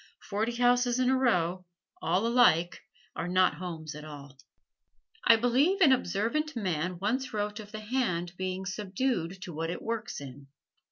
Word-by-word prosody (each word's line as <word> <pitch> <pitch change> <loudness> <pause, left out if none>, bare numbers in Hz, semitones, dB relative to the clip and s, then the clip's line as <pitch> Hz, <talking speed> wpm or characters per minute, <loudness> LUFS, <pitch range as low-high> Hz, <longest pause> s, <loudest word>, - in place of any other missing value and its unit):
Forty 220 +4 0
houses 245 0 +3
in 255 0 +2
a - - +4
row, 185 -8 +1 0.4
all 180 +6 +1
alike, 230 -8 +3 0.3
are 165 - -3
not 185 0 +3
homes 165 -3 -6
at 150 0 -9
all. 140 -3 -11 0.9
I 230 - +8
believe 260 - +2
an 320 -8 +6
observant 255 - 0
man 180 -4 -2
once 225 +6 -2
wrote 210 +1 -2
of 210 -1 -10
the 215 - -6
hand 210 -7 -1
being 185 +1 -3
subdued 190 -1 -2
to 180 -5 -7
what 165 +2 -3
it 175 - -5
works 230 0 -3
in. 140 0 -10
200 Hz, 160 wpm, -29 LUFS, 175-245 Hz, 0.9 s, I